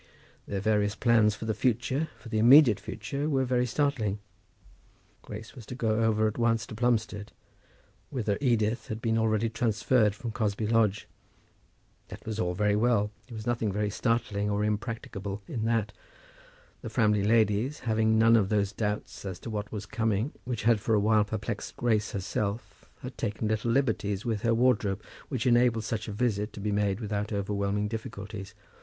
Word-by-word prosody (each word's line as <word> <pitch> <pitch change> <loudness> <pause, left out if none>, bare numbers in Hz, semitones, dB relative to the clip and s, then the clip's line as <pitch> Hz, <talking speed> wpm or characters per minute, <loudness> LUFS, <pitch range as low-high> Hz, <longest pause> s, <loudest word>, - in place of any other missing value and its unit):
Their 100 -1 -3
various 105 0 +1
plans 115 -3 +3
for 110 - -7
the 110 - 0
future, 130 +6 0
for - - -13
the 110 -1 0
immediate 120 -1 +7
future, 140 +8 -4
were 135 -3 +1
very 125 0 +1
startling. 125 -6 0 1.0
Grace 110 - -9
was 125 - -11
to 125 - -6
go 110 -3 0
over 110 -1 +2
at 110 +2 -4
once 115 -1 +2
to - - -10
Plumstead, 110 -3 -1 0.8
whither 110 -7 -1
Edith 115 -3 +1
had 110 - -4
been 115 -1 0
already 110 0 +1
transferred 110 -1 +1
from 115 +1 -5
Cosby 110 -1 -1
Lodge. 110 -2 +2 1.0
That - - -11
was 110 -1 -4
all 90 -4 0
very 105 +1 +2
well; 105 -2 +2 0.2
there 120 - -9
was 110 0 -7
nothing 115 -3 0
very 105 +1 -1
startling 110 -3 0
or 105 0 0
impracticable 105 -2 -3
in 110 -2 -3
that. 115 -2 0 0.9
The - - -6
Framley 105 -4 +2
ladies, 110 +5 +2
having 110 -1 +2
none 115 +1 +6
of 100 -4 +3
those 100 -2 +1
doubts 105 0 -3
as 95 -3 -5
to 115 - -6
what 105 -1 -4
was 105 -2 -5
coming 110 +3 -1
which 120 -4 -3
had 115 -1 +4
for 110 - +2
a - - +4
while 105 0 +3
perplexed 105 0 -5
Grace 110 -3 +1
herself, 100 +1 -4
had 125 -2 -8
taken 105 0 -2
little 110 +2 0
liberties 110 -6 0
with 110 -3 -1
her 115 -1 +2
wardrobe, 110 -5 +2 0.3
which 130 -4 -2
enabled 120 -2 +3
such 110 0 -3
a - - -4
visit 105 -1 -1
to - - -8
be 105 +1 -2
made 100 -1 0
without 105 -1 -3
overwhelming 100 0 -1
difficulties. 105 -2 -7
110 Hz, 175 wpm, -28 LUFS, 105-115 Hz, 1.0 s, immediate